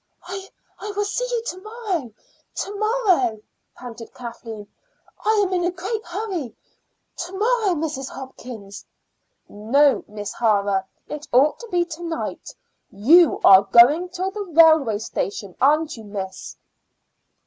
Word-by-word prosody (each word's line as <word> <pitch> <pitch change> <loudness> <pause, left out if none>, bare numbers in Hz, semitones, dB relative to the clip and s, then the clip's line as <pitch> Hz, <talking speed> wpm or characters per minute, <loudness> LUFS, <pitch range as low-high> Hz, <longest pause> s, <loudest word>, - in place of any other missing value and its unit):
"I 385 +1 -7 0.5
will 410 0 0
see 445 +5 -2
you 475 -2 -1
to 365 - -4
morrow 410 - -4 0.4
to 405 - -4
morrow," 400 - +1 0.4
panted 235 -2 -10
Kathleen. 230 -3 -8 0.6
"I 430 -1 +3
am 375 - -3
in 355 -1 +1
a 350 - +2
great 390 +5 -4
hurry. 350 - -5 0.6
To 350 +2 -6
morrow, 435 -3 +2
Mrs. 295 -4 -3
Hopkins." 240 -6 -9 0.6
"No, 270 +7 +2
Miss 205 -1 -6
O'Hara; 200 -4 +1 0.2
it 300 0 -7
ought 270 +5 +4
to 470 - -9
be 355 -4 +1
to 340 0 -9
night. 335 -1 -5 0.3
You 305 - +5
are 190 0 +9
going 245 - +5
to 370 +1 -2
the 420 +1 -5 0.2
railway 315 -10 +6
station, 200 -3 -4
aren't 305 +3 +3
you, 225 - -11
miss?" 195 -2 -7
310 Hz, 135 wpm, -22 LUFS, 225-380 Hz, 0.6 s, are